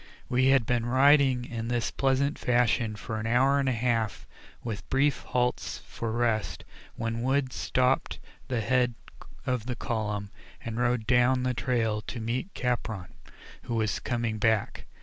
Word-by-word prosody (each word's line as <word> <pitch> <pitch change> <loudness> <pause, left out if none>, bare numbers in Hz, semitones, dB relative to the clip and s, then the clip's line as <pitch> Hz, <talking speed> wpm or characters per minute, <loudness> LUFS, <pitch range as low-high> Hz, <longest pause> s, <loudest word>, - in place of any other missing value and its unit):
We 130 +1 +3
had 135 -3 +4
been 120 0 0
riding 130 -1 +4
in 115 -1 -5
this 120 -1 -1
pleasant 135 +2 +1
fashion 120 -2 +2
for 110 +1 -5
an 110 - -3
hour 135 +4 +3
and 135 -1 +1
a - - +2
half 115 -3 -1 0.4
with 110 -3 -5
brief 135 +1 +2
halts 125 0 -1
for 115 -1 -4
rest, 115 -2 0 0.3
when 115 0 -3
Wood 130 +1 +1
stopped 130 +1 +1 0.3
the 125 -3 -1
head 125 +1 +2 0.5
of 125 -3 -1
the 125 - -2
column, 105 -4 -3 0.3
and 115 -1 -4
rode 120 -2 +1
down 125 +2 +3
the 125 0 +1
trail 115 -4 0
to 120 - -6
meet 120 - -3
Capron, 110 - -2 0.5
who 120 - -2
was 110 -3 0
coming 115 -3 -2
back. 110 -1 0
120 Hz, 155 wpm, -28 LUFS, 115-130 Hz, 0.5 s, had